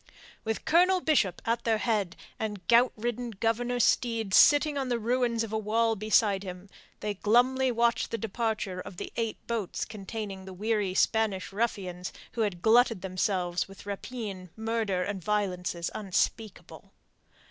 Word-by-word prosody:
With 220 0 -3
Colonel 365 +3 +4
Bishop 250 - +1
at 230 +1 0
their 225 -1 +2
head, 210 -5 0 0.2
and 210 -5 -4
gout 240 +2 +5
ridden 240 +2 -3
Governor 230 +3 -1
Steed 230 -4 +1
sitting 290 - +6
on 270 -2 -2
the 240 - +1
ruins 235 0 0
of 220 -1 -6
a 220 - +1
wall 225 +2 +1
beside 210 -1 +2
him, 185 0 -8 0.3
they 210 -1 -2
glumly 250 +6 +3
watched 235 -1 +1
the 230 - -2
departure 220 -4 -2
of 180 0 -9
the - - -6
eight 225 -2 -2
boats 225 -5 -2
containing 205 -2 -6
the 190 - -8
weary 205 -1 -1
Spanish 205 -3 +1
ruffians 190 -5 -2 0.2
who 235 - -3
had 195 -5 -2
glutted 230 -3 +4
themselves 185 -1 -1
with 195 0 -13
rapine, 200 -3 -6
murder, 220 -4 -1
and 195 -2 -4
violences 180 -4 -1
unspeakable. 210 +1 -3
220 Hz, 150 wpm, -28 LUFS, 195-235 Hz, 0.3 s, sitting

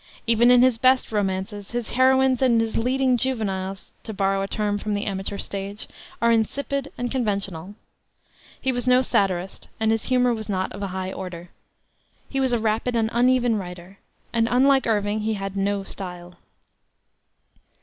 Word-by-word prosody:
Even 235 +1 +4
in 250 0 +7
his 255 -3 +3
best 255 -1 +3
romances 200 0 -2
his 240 -2 -3
heroines 260 0 +3
and 245 -3 +4
his 225 -1 -1
"leading 255 +1 +2
juveniles" 195 -7 -2
to 220 - -7
borrow 195 0 +1
a 195 - -2
term 205 0 -1
from 210 0 -2
the 205 - -2
amateur 195 0 -3
stage 200 +1 -4 0.4
are 235 - +5
insipid 275 +5 -1
and 245 0 -3
conventional. 200 -6 -2 0.8
He 265 - 0
was 245 -1 -3
no 250 +1 +5
satirist, 190 -5 -1
and 220 0 +2
his 225 -1 0
humor 250 -1 +2
was 220 -2 -6
not 190 -1 -1
of 200 - -8
a 200 - -2
high 190 0 -4
order. 180 -2 -7 0.8
He 270 - -2
was 260 -1 +1
a 240 - +3
rapid 225 +2 0
and 225 -1 +1
uneven 245 -1 +3
writer, 180 0 -8 0.3
and, 230 -1 +2
unlike 265 +1 +4
Irving, 210 -1 0
he 215 +1 -1
had 195 -1 -5
no 200 0 0
style. 180 -2 -8
220 Hz, 170 wpm, -24 LUFS, 195-245 Hz, 0.8 s, in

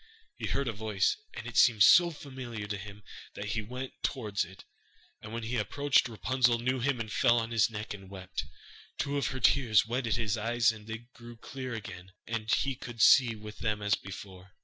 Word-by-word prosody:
He - - -4
heard 140 - -1
a 115 - -1
voice, 105 -2 0 0.2
and - - -7
it 120 - -5
seemed 110 -5 +6
so 175 - +8
familiar 130 -8 -7
to 105 0 -4
him 100 +1 -10 0.3
that 100 +1 -5
he 110 +1 -1
went 125 +4 -6
towards 105 -7 -1
it, 95 +2 -13 0.6
and 110 - -9
when 115 0 -4
he 120 +2 -2
approached, 140 +4 +2
Rapunzel 120 +1 +2
knew 130 +2 -1
him 130 0 0
and 110 -2 -4
fell 120 - +4
on 115 0 -1
his 115 -1 +3
neck 110 -1 -5
and 95 -2 -11
wept. 95 -2 -5 0.5
Two 140 0 -1
of 140 - 0
her 130 - -4
tears 115 -4 +4
wetted 120 0 -1
his 110 -2 -1
eyes 115 +2 +2
and 110 -1 -12
they 115 +1 -6
grew 120 0 -12
clear 130 0 -6
again, 95 -3 -9
and 115 -1 -3
he 140 - +2
could 120 -2 -9
see 120 -1 +6
with 105 0 -10
them 105 -2 -1
as 105 0 +2
before. 95 -1 -6
115 Hz, 205 wpm, -30 LUFS, 105-125 Hz, 0.6 s, so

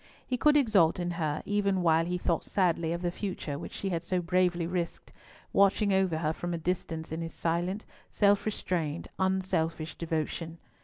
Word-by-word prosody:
He 255 - -1
could 295 +5 +4
exult 200 - +4
in 175 0 -1
her, 155 -3 -2
even 200 -2 +1
while 165 -1 +4
he 180 +1 -1
thought 175 -2 0
sadly 170 -4 +1
of 170 +1 -3
the 175 - 0
future 175 -7 -4
which - - -7
she 195 - -3
had 170 -3 -1
so 180 +1 0
bravely 180 -1 +1
risked, 170 -1 -4 0.4
watching 200 +1 +4
over 190 -4 +2
her 155 -1 0
from 175 +1 -3
a - - -2
distance 165 -2 -3
in 160 +1 -3
his 165 0 -5
silent, 175 +5 -1 0.2
self 205 0 +3
restrained, 170 -6 -2
unselfish 185 -4 0
devotion. 165 0 -3
175 Hz, 175 wpm, -29 LUFS, 165-190 Hz, 0.4 s, could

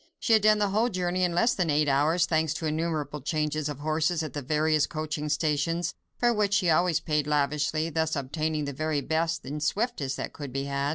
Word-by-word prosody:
She 230 - +2
had 220 - +6
done 215 0 +5
the 205 -1 +1
whole 220 +5 +2
journey 185 -2 -1
in 175 -1 +1
less 235 +7 +3
than 180 -4 -1
eight 150 0 +2
hours, 155 +5 +3
thanks 160 -2 0
to 160 - -4
innumerable 155 -2 -2
changes 150 +1 -1
of 145 -1 -6
horses 160 +2 0
at 155 -5 -6
the 145 - -3
various 155 +2 +1
coaching 155 -1 -4
stations, 155 +3 0 0.2
for 240 0 +3
which 205 -2 +1
she 180 -4 +3
always 170 0 +3
paid 150 -2 -1
lavishly, 150 +1 0
thus 160 0 0
obtaining 155 +2 -2
the 140 - -4
very 155 +1 -1
best 160 +2 -1
and 150 +3 -5
swiftest 150 - -1
that - - -5
could 145 -3 -7
be 135 +2 -2
had. 140 0 -1
155 Hz, 215 wpm, -27 LUFS, 150-170 Hz, 0.2 s, had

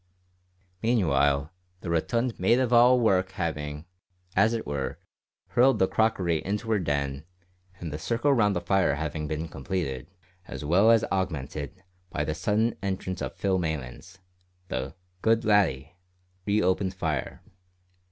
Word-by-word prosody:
Meanwhile 70 - +2 0.3
the 85 - -4
rotund 115 +9 0
maid 120 - +4
of 125 -2 +1
all 125 +1 +6
work 95 -5 +2
having, 75 -3 -4 0.5
as 110 +4 +4
it 115 - -4
were, 70 -2 -3 0.5
hurled 130 +2 +4
the 95 - +3
crockery 95 -8 +1
into 105 +4 -2
her 105 - +3
den, 70 -4 -2 0.6
and 80 -4 -5
the 75 - -4
circle 120 - +1
round 105 -6 +3
the 90 - -1
fire 95 -7 +2
having 75 0 -3
been 80 +2 -3
completed, 70 -3 -4 0.4
as - - -6
well 95 +8 +4
as 115 -2 +5
augmented, 80 -2 -3 0.3
by 75 - -2
the 75 - -2
sudden 105 +8 0
entrance 95 -2 -3
of - - -4
Phil 95 -2 0
Maylands, 80 -1 -5 0.5
the 65 +4 -4 0.3
"good 115 0 +2
laddie" 85 -9 +2 0.5
re 105 +1 +2
opened 95 +1 +1
fire. 80 -7 -3
90 Hz, 140 wpm, -27 LUFS, 75-105 Hz, 0.6 s, all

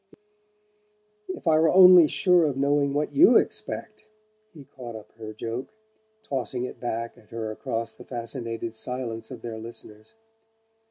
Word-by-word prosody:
"If 185 - -6
I 155 -1 +5
were 160 0 +4
only 180 -3 +8
sure 180 +1 +3
of 140 -3 -1
knowing 140 0 +2
what 150 +1 -1
you 340 +6 +7
expect!" - - -3 0.4
he 150 -4 -13
caught 125 -4 -10
up 105 -1 -11
her 110 -1 -7
joke, 115 +4 -5 0.6
tossing 125 - -3
it - - -9
back 115 -1 -4
at 105 - -23
her 115 -1 -4
across 115 -1 -4
the - - -13
fascinated 115 -2 -5
silence 115 -1 -4
of 125 -3 -10
their 115 -2 -6
listeners. 110 - -10
120 Hz, 150 wpm, -25 LUFS, 115-145 Hz, 0.6 s, only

